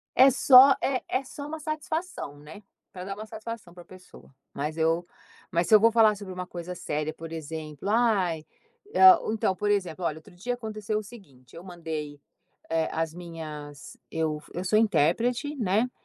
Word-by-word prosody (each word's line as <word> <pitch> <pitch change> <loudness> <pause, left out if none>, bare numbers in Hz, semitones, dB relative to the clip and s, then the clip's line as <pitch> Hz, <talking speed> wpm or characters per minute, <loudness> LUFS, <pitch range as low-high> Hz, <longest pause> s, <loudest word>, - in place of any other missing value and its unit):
É 265 +2 +8
só 265 +1 +8
é 265 -1 0
é 260 +2 0
só 285 +2 -8
uma 315 +1 -6
satisfação, 310 - -4
né. 155 +8 -12 0.3
Pra 180 -1 -8
dar 195 +1 -5
uma 215 +1 -8
satisfação 220 -4 -8
para 175 -1 -12
pessoa. 185 0 -16 0.2
Mas 150 +3 -4
eu 165 +2 +1 0.4
mas 170 -1 +1
se - - +1
eu - - +8
vou 230 +2 +5
falar 220 -2 +5
sobre 195 -2 -8
uma 180 0 -5
coisa 180 0 -7
séria, 155 -1 -3
por 165 0 -9
exemplo, 155 +1 -6
ai, 200 -8 +2 0.8
então, 215 -3 0
por 205 +2 -2
exemplo, 185 -3 -1
olha 155 - -1
outro 160 +3 -16
dia 240 +8 -3
aconteceu 215 -2 -3
o - - -7
seguinte: 145 - -16
Eu 170 - -10
mandei, 160 -5 -6 0.5
eh, 160 -1 +1
as 160 -1 -2
minhas 155 -5 -9
eu 155 -2 -2
eu 180 - -4
sou 215 +3 +3
intérprete, 225 - +1
né, 220 +2 +1
180 Hz, 175 wpm, -27 LUFS, 160-225 Hz, 0.8 s, É